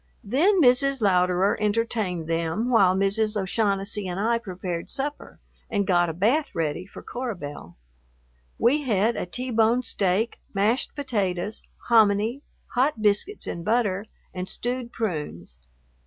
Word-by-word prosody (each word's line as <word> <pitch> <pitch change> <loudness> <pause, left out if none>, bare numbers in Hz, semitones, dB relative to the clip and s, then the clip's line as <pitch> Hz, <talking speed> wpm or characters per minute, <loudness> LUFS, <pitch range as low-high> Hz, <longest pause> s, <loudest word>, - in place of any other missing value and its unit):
Then 330 - +3
Mrs. 275 0 +4
Louderer 185 -1 +3
entertained 210 -5 -1
them 165 +9 -1
while 190 -6 +5
Mrs. 210 +2 +1
O'Shaughnessy 200 0 -1
and 180 +1 -4
I 230 +3 +1
prepared 180 -5 -5
supper 285 +1 -4 0.3
and 205 -3 0
got 175 -2 +3
a - - -3
bath 235 - +1
ready 165 +2 -2
for - - -11
Cora 245 -3 -4
Belle. 145 - -9 0.8
We 275 +6 +3
had 225 -3 +1
a - - -3
T 250 +7 -4
bone 230 +2 +3
steak, 205 0 0 0.2
mashed 215 +6 +1
potatoes, 210 -7 -2 0.3
hominy, 220 +2 +3 0.3
hot 255 0 +1
biscuits 210 - +1
and 170 - -5
butter, 205 -2 +1 0.3
and 180 0 -5
stewed 245 0 -3
prunes. 150 - -4
210 Hz, 135 wpm, -25 LUFS, 185-240 Hz, 0.8 s, while